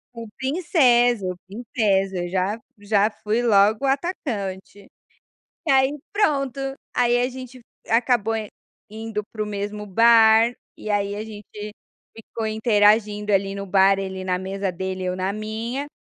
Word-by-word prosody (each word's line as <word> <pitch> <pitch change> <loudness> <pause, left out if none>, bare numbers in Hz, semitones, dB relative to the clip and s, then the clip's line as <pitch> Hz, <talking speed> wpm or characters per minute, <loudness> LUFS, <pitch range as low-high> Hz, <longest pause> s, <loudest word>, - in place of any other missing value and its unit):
O 230 -1 -7
"princeso", 245 - +2
"princeso". 200 -3 -1
Eu 175 -1 -3
já 190 +4 -1 0.2
já 205 +1 +2
fui 215 +2 -2
logo 215 +1 +3
atacante. 210 - -3 0.8
E 300 - +2
aí, 270 +2 +3
pronto, 280 - 0 0.3
aí 245 -1 +2
a 250 - 0
gente 255 -1 -10 0.3
acabou 230 -1 +2
in 215 -2 -4 0.4
indo 220 0 -5
para 215 - -5
o - - 0
mesmo 210 0 -5
bar, 225 +2 +5 0.2
e - - -8
aí 205 -1 0
a 210 - -4
gente 210 -1 -9 0.4
ficou 225 0 -7
interagindo 210 -1 +2
ali 195 0 +1
no 200 0 -5
bar, 195 0 +4
ele 190 -1 -5
na 180 -1 0
mesa 195 +1 -3
dele, 185 +1 -4
eu 180 0 -1
na 185 +1 -1
minha. 225 +6 -4
215 Hz, 140 wpm, -23 LUFS, 200-240 Hz, 0.8 s, bar